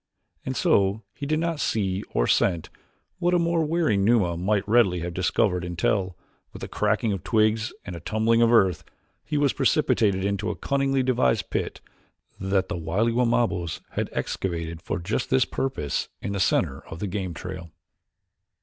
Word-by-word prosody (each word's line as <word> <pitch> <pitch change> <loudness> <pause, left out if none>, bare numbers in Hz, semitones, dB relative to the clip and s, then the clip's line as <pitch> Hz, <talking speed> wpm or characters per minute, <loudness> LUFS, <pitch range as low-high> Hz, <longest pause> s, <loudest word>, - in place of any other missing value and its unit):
And - - -3
so 100 +2 +2
he 140 - -6
did 155 +1 +1
not 165 -1 -1
see 100 -7 0
or - - +1
scent 85 +2 +1 0.5
what 175 0 +2
a - - +5
more 170 -1 +1
wary 155 -9 +1
Numa 100 -4 +3
might 100 +4 0
readily 105 -6 +3
have 85 +1 -4
discovered 90 0 +1
until, 90 +1 -1 0.3
with - - -10
the - - -3
cracking 110 -3 0
of 95 - -5
twigs 110 0 +2
and 90 - -6
a - - -6
tumbling 110 +6 +1
of 115 0 +4
earth, 95 -7 +3 0.4
he 150 - -2
was 145 -2 +2
precipitated 115 -9 +2
into 100 +2 -1
a 105 - -2
cunningly 135 +5 0
devised 125 -5 +1
pit - - -3 0.6
that 95 0 0
the - - -3
wily 95 +8 0
Wamabos 115 -8 0
had - - -2
excavated 85 -3 -3
for - - -3
just 105 +8 -2
this 130 -1 +3
purpose 75 - -2
in - - -4
the 100 - -2
center 95 - +1
of 80 - -8
the 105 - -3
game 95 -3 -3
trail. 90 0 -7
100 Hz, 170 wpm, -25 LUFS, 90-120 Hz, 0.6 s, a